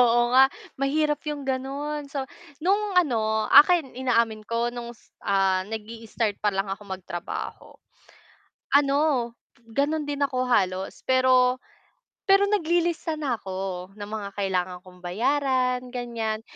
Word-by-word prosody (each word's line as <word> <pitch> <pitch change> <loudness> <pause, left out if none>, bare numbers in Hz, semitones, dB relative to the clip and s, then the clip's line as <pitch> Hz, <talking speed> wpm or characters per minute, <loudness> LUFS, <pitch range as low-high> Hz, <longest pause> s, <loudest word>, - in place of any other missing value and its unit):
Oo 240 0 +4
nga. 265 +1 +8 0.3
Mahirap 295 +2 +1
yung 295 -2 -3
gano'n. 280 +3 -3
So, 275 -1 -4 0.4
nung 400 +3 +1
ano, 220 -10 +2
akin 300 0 +7
inaamin 230 -4 0
ko 235 +1 0
nung 240 0 -7
s - - -26
ah, 190 -1 +2
nag-i-start 220 0 -4
pa 210 - +1
lang 195 0 -1
ako 195 +2 -5
magtrabaho. 185 -2 -6 1.0
Ano, 280 -4 +1 0.3
gano'n 290 +6 0
din 290 -1 -4
ako 255 -2 +1
halos, 190 -5 0
pero, 255 -1 +4 0.7
pero 390 0 +6
naglilista 340 -4 +1
na 280 -6 -2
ako 190 -1 -5
ng 205 0 -8
mga 215 -2 -4
kailangan 185 -2 -1
kong 180 -1 -16
bayaran, 250 +7 +1
ganyan. 230 -3 -3
245 Hz, 125 wpm, -25 LUFS, 210-285 Hz, 1.0 s, nga